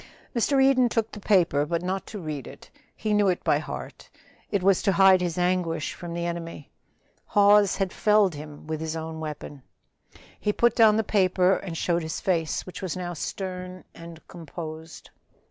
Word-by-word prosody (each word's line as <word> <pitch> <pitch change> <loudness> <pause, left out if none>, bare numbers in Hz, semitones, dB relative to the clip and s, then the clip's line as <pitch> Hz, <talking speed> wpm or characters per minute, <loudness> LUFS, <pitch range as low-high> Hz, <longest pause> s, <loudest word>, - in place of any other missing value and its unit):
Mr. 270 +4 +2
Eden 255 -2 +4
took 225 -1 -1
the 210 - -8
paper, 180 -8 +3
but 170 +3 -2
not 190 +1 -3
to 215 - -7
read 155 - -5
it - - -13 0.2
he 215 - -2
knew 205 -1 +3
it 180 -2 0
by - - +2
heart. - - -8 0.4
It 200 -3 -1
was 195 -1 +4
to 200 - +2
hide 190 0 +6
his 175 -2 -2
anguish 175 -3 0
from 170 -1 -7
the 170 0 -2
enemy. 165 -3 -6 0.6
Hawes 205 -1 +5
had 195 -2 -2
felled 210 -4 +3
him 150 0 -10
with 155 0 -4
his 160 0 -3
own 160 0 -5
weapon. 150 -2 -7 0.8
He 210 - 0
put 235 +1 +2
down 220 -2 +6
the 220 - +2
paper 185 -2 +2
and 175 -3 -6
showed 175 +1 0
his 160 -1 -4
face, 165 -4 -1
which 185 - -9
was 185 -2 -4
now 175 -1 -4
stern 185 +2 -6
and 165 -1 -12
composed. 160 -1 -9
180 Hz, 180 wpm, -25 LUFS, 165-200 Hz, 0.8 s, hide